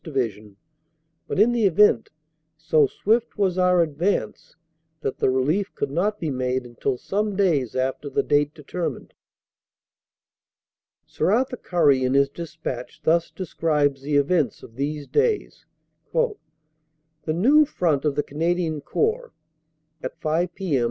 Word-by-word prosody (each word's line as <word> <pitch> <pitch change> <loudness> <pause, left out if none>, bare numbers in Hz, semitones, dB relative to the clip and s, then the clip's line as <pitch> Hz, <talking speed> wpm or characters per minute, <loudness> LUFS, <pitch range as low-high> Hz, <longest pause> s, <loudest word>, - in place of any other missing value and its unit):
Division, 110 - -3 0.7
but - - -2
in 220 +4 +5
the 235 -3 +1
event, 185 - +4 0.5
so 155 -2 +3
swift 225 - 0
was 190 -3 +1
our 180 -1 +4
advance 165 +6 -2 0.5
that 135 - -3
the - - +3
relief 150 +10 0
could - - -2
not 205 +7 0
be 160 -3 -2
made 130 -1 -1
until 125 +2 -3
some 205 +7 -2
days 160 - +1
after 130 +2 -2
the - - 0
date 145 0 +2
determined. 165 +3 -5 1.9
Sir - - -1
Arthur 255 +4 +1
Currie 145 - +2
in 130 +1 +1
his 140 0 +4
despatch 150 -6 -7
thus 170 +1 +2
describes 150 -6 -1
the 145 +1 -2
events 145 - +1
of - - -12
these 145 +2 -3
days: 440 - -1 0.5
"The 485 -2 +2 1.0
new 275 - +5
Front 165 - 0
of 150 -2 0
the 145 - 0
Canadian 165 0 -1
Corps 450 - -1 0.7
(at 130 - -6
5 165 +3 -1
p.m. 175 -9 0
160 Hz, 135 wpm, -23 LUFS, 140-190 Hz, 1.9 s, in